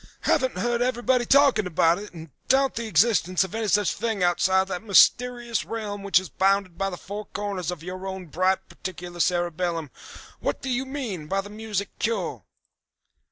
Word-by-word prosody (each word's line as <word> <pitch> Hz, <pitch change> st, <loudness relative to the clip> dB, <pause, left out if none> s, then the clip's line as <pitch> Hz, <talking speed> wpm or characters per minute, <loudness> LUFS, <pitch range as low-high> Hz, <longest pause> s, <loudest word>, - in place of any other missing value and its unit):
Haven't 260 Hz, -1 st, +1 dB
heard 240 Hz, 0 st, 0 dB
everybody 245 Hz, 0 st, +1 dB
talking 275 Hz, -8 st, +4 dB
about 165 Hz, +1 st, +3 dB
it, 210 Hz, -, -9 dB
and 160 Hz, -3 st, -11 dB, 0.2 s
doubt 270 Hz, +1 st, +3 dB
the 230 Hz, 0 st, -4 dB
existence 185 Hz, -1 st, +3 dB
of 190 Hz, -, -7 dB
any 225 Hz, -1 st, -2 dB
such 205 Hz, 0 st, +2 dB
thing 220 Hz, -3 st, -2 dB
outside 190 Hz, +2 st, +3 dB
of 190 Hz, -, -3 dB
that 180 Hz, -, -3 dB
mysterious 240 Hz, +3 st, +3 dB
realm 210 Hz, -3 st, -5 dB
which 195 Hz, -2 st, +3 dB
is 185 Hz, -, -8 dB
bounded 195 Hz, -2 st, +1 dB
by 195 Hz, +2 st, -1 dB
the 180 Hz, -, -6 dB
four 205 Hz, +4 st, -7 dB
corners 200 Hz, -5 st, -4 dB
of 175 Hz, -3 st, -5 dB
your 185 Hz, +2 st, -6 dB
own 190 Hz, -1 st, -5 dB
bright 185 Hz, +4 st, 0 dB
particular 175 Hz, -1 st, -8 dB
cerebellum. 175 Hz, -3 st, 0 dB, 0.5 s
What -, -, -2 dB
do 265 Hz, -, -2 dB
you 265 Hz, +2 st, -1 dB
mean 235 Hz, -, -5 dB
by 195 Hz, +4 st, 0 dB
the 205 Hz, +1 st, -11 dB
music 210 Hz, -2 st, -3 dB
cure?" 185 Hz, -, -2 dB
195 Hz, 180 wpm, -25 LUFS, 180-230 Hz, 0.5 s, talking